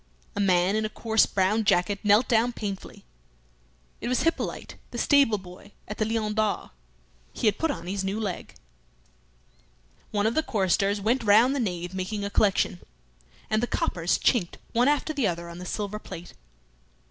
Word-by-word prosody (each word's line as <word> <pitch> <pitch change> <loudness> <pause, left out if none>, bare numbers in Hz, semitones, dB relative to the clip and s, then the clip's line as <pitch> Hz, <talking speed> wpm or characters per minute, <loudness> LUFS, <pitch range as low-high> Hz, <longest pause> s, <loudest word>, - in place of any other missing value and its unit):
A - - -3
man 185 0 +3
in 220 - +1
a 215 - -1
coarse 220 0 +2
brown 200 +3 +1
jacket 200 0 +2
knelt 210 +3 +4
down 240 0 +2
painfully. 200 -4 -6 1.0
It - - -4
was 250 +1 +1
Hippolyte, 330 +1 -2 0.2
the 240 - -7
stable 275 -4 +4
boy 190 +2 -13
at 210 - -7
the 215 - +2
"Lion 220 -1 -1
d'Or." 215 -1 -1 0.6
He - - -4
had 210 - +2
put 325 - +1
on 170 - -4
his 190 +2 -3
new 195 +3 -2
leg. 200 -5 -5 1.5
One 205 -1 0
of 220 - +2
the 315 - +2
choristers 200 - +1
went 230 +5 +1
round 225 +5 +5
the - - -1
nave 180 -5 -3
making 200 +2 -3
a 200 - -4
collection, 195 -3 +2 0.7
and 215 - +1
the 245 - 0
coppers 170 -5 0
chinked 205 -9 +1 0.2
one 245 +2 +3
after 295 +2 +1
the 275 -7 +1
other 170 -1 -3
on 170 +1 -9
the 180 - -7
silver 210 +1 -3
plate. 175 -4 -10
210 Hz, 175 wpm, -26 LUFS, 190-225 Hz, 1.5 s, round